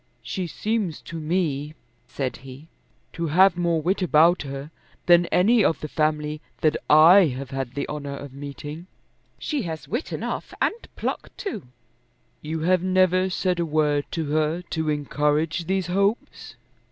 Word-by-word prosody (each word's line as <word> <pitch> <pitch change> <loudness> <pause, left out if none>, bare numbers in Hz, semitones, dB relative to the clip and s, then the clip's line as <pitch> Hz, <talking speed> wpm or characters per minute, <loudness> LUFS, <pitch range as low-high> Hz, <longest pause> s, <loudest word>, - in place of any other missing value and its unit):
"She 185 -3 -3
seems 210 -2 -2
to 165 - -7
me," 155 -3 -1 0.3
said 135 0 -4
he, 135 +3 -12 0.5
"to 170 -1 -3
have 180 +4 +5
more 170 -2 0
wit 190 +4 0
about 170 0 +4
her 140 +1 -7 0.3
than 175 0 +5
any 215 +5 +4
of 165 - +2
the 155 - -5
family 150 0 -1 0.2
that 155 -1 +3
I 170 +6 +8
have 135 0 -7
had 135 -2 -4
the 140 - -2
honour 145 -2 -5
of 140 -2 -9
meeting." 145 +4 -8 0.5
"She 295 -3 -2
has 160 -1 -6
wit 240 +8 -3
enough, - - -4
and - - +2 0.2
pluck - - -4
too." 280 - -5 0.7
"You 155 +1 -4
have 180 +2 +3
never 185 0 +2
said 180 -1 -1
a - - +2
word 150 -2 +1
to 165 -2 -3
her 155 +3 0
to 160 -1 -1
encourage 150 +2 0
these 190 +1 0
hopes." 200 +5 -1
160 Hz, 155 wpm, -24 LUFS, 150-180 Hz, 0.7 s, I